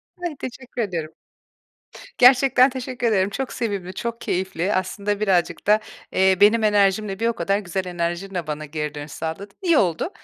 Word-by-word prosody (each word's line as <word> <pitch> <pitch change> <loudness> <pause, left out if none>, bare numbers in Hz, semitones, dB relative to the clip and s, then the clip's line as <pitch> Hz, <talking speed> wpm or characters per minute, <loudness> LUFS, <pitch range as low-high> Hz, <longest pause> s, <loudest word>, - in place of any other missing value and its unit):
Ay, 350 -5 -5
teşekkür 255 -1 -6
ediyorum. 165 -7 -3 1.0
Gerçekten 255 +1 +6
teşekkür 255 -2 -3
ederim. 195 -3 +2
Çok 260 +6 -4
sevimli, 200 -5 -3
çok 235 +4 -5
keyifli, 185 +1 -1
aslında, 200 +2 -1
birazcık 190 -4 0
da, 210 +1 +5 0.3
eee, 190 0 +3
benim 215 +2 +5
enerjimle, 205 -1 +2
bir 230 - +1
o 235 - +1
kadar 200 -3 0
güzel 190 -1 -3
enerjinle 175 0 -3
bana 155 0 -4
geri 150 0 -4
dönüş 145 0 -7
sağladın. 165 +5 -5
İyi 340 -4 +3
oldu. 175 - +1
200 Hz, 160 wpm, -22 LUFS, 180-235 Hz, 1.0 s, Gerçekten